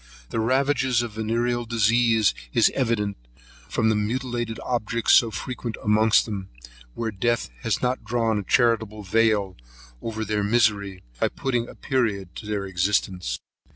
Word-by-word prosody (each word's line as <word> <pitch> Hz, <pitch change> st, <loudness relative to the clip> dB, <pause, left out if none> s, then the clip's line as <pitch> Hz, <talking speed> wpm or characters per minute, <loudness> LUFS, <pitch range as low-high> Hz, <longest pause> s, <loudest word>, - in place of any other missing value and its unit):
The -, -, -1 dB
ravages 130 Hz, +1 st, +2 dB
of 115 Hz, -3 st, -6 dB
the 110 Hz, -, -5 dB
venereal 120 Hz, +2 st, 0 dB
disease 115 Hz, -1 st, +3 dB, 0.2 s
is -, -, +4 dB
evident, 115 Hz, -6 st, 0 dB, 0.5 s
from 110 Hz, -1 st, +1 dB
the 110 Hz, -, +2 dB
mutilated 120 Hz, +1 st, -2 dB
objects 115 Hz, -2 st, +1 dB
so 115 Hz, -, +6 dB
frequent 120 Hz, 0 st, -5 dB
amongst 110 Hz, +1 st, +4 dB
them, 100 Hz, -4 st, -5 dB, 0.5 s
where 115 Hz, -1 st, -2 dB
death 120 Hz, -, -1 dB
has -, -, -1 dB
not 125 Hz, +1 st, +1 dB
thrown 115 Hz, -3 st, +1 dB
a -, -, -4 dB
charitable 110 Hz, -1 st, +1 dB
veil 105 Hz, -1 st, +2 dB, 0.5 s
over 110 Hz, -1 st, -4 dB
their 105 Hz, 0 st, -1 dB
misery, 100 Hz, -4 st, +1 dB, 0.2 s
by -, -, +3 dB
putting 120 Hz, -3 st, -2 dB
a -, -, -11 dB
period 105 Hz, -, -1 dB
to 105 Hz, -, -8 dB
their 105 Hz, -2 st, -2 dB
existence. 90 Hz, -7 st, 0 dB
110 Hz, 150 wpm, -24 LUFS, 105-120 Hz, 0.5 s, so